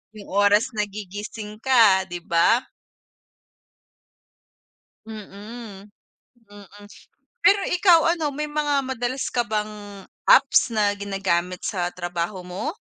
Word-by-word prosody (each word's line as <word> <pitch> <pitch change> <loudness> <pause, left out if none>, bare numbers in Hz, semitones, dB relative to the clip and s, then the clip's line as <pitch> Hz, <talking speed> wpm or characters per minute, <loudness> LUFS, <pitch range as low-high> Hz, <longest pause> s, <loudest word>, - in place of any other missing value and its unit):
Yung 205 -2 -12
oras 205 +2 +4
nagigising 210 +1 -6
ka, 225 -7 +4
'di 175 -1 -6
ba? 170 +9 +4 2.4
Mm, 210 -1 -10 0.6
mm. 205 0 -15 0.6
Pero 405 0 +5
ikaw 355 -2 +5 0.2
ano, 305 -3 -2
may 300 +2 -4
mga 295 -1 0
madalas 260 0 -3
ka 240 - +1
bang 210 -2 -5 0.2
apps 275 - +5
na 210 -2 +2
ginagamit 190 -3 -2
sa 175 -4 -2
trabaho 175 +1 -4
mo? 185 - -5
210 Hz, 105 wpm, -23 LUFS, 195-245 Hz, 2.4 s, Pero